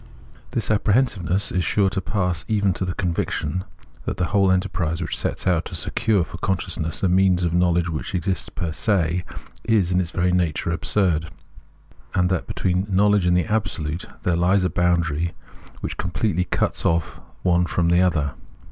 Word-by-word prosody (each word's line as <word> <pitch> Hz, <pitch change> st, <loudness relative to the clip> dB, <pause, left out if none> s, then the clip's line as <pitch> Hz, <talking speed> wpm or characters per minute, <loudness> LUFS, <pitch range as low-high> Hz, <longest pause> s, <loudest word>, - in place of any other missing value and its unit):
This -, -, -2 dB
apprehensiveness 100 Hz, -4 st, +1 dB
is 90 Hz, -, 0 dB
sure 95 Hz, +4 st, +2 dB
to 95 Hz, -, -1 dB
pass 90 Hz, -1 st, -1 dB
even 105 Hz, -3 st, +2 dB
into 95 Hz, 0 st, -1 dB
the 90 Hz, -, -3 dB
conviction 90 Hz, -1 st, -2 dB, 0.4 s
that -, -, -3 dB
the 90 Hz, -, +1 dB
whole 100 Hz, -2 st, +4 dB
enterprise 90 Hz, -3 st, 0 dB
which 85 Hz, -, -2 dB
sets -, -, -2 dB
out 90 Hz, -3 st, +2 dB
to -, -, -6 dB
secure 95 Hz, +5 st, +1 dB
for 85 Hz, -, -9 dB
consciousness 85 Hz, -3 st, -2 dB
by 95 Hz, -, +3 dB
means 90 Hz, 0 st, +3 dB
of 85 Hz, -1 st, 0 dB
knowledge 85 Hz, -1 st, +2 dB
what 85 Hz, +3 st, -4 dB
exists 95 Hz, +1 st, -1 dB
fer 85 Hz, -, -2 dB
se, 90 Hz, -4 st, +1 dB, 0.4 s
is 105 Hz, -6 st, +2 dB
in 90 Hz, 0 st, +3 dB
its 85 Hz, -, -3 dB
very 90 Hz, +1 st, +1 dB
nature 85 Hz, -2 st, 0 dB
absurd; 85 Hz, -3 st, +1 dB, 0.9 s
and 90 Hz, -1 st, +2 dB
that 95 Hz, -, -1 dB
between 90 Hz, +1 st, -1 dB
knowledge 100 Hz, -1 st, +3 dB
and 90 Hz, 0 st, +4 dB
the 90 Hz, -, +1 dB
Absolute 90 Hz, -6 st, -2 dB, 0.2 s
there 90 Hz, -, +2 dB
lies 90 Hz, +3 st, +3 dB
a 90 Hz, -, 0 dB
boundary 85 Hz, -2 st, +1 dB, 0.5 s
which -, -, -4 dB
completely 90 Hz, 0 st, -1 dB
cuts 90 Hz, -, 0 dB
o£E 85 Hz, -1 st, +2 dB
the -, -, -14 dB, 0.2 s
one 90 Hz, -1 st, +3 dB
from 85 Hz, -1 st, +1 dB
the 85 Hz, +1 st, +4 dB
other. 80 Hz, -6 st, +1 dB
90 Hz, 175 wpm, -23 LUFS, 85-95 Hz, 0.9 s, whole